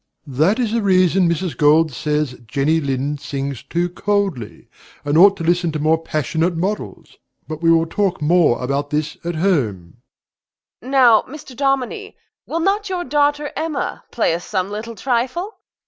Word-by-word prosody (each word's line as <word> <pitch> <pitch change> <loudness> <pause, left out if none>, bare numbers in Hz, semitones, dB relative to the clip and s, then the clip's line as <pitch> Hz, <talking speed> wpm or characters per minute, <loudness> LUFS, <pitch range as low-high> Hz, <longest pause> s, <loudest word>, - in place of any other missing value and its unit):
DOMINIE. 135 -3 -9
That 190 +9 +4
is 235 -4 0
the 230 0 0
reason 185 -2 +3
Mrs. 170 -3 -2
Gold 155 +3 +4
says 150 0 -1
that 120 -2 -16
Jenny 150 +6 +1
Lind 140 +1 -2
sings 140 -3 -4
too 175 +5 -2
coldly, 190 - -2 0.4
and 145 +1 0
ought 195 +4 +6
to - - -5
listen 175 0 +1
to - - -1
more 155 +2 +2
passionate 160 +3 -1
models. 195 +5 -4 0.3
But 155 0 -6
we 165 - +3
will 165 0 +4
talk 190 +2 -1
more 155 -5 +2
about 140 +3 -2
this 150 0 -2
at 170 0 -3
home. 120 - -1
MRS. - - -65
GOLD. 260 - -9
Now, 245 -5 +6
Mr. 275 -2 -11
Dominie, 275 - -2 0.3
will 330 - -2
not 400 +3 0
your 360 -2 -2
daughter 290 -2 0
Emma 320 -3 -3
play 225 -8 0
us 170 +1 -4
some 190 -1 -2
little 220 +2 -6
trifle? 260 - -2
175 Hz, 175 wpm, -19 LUFS, 150-230 Hz, 0.4 s, ought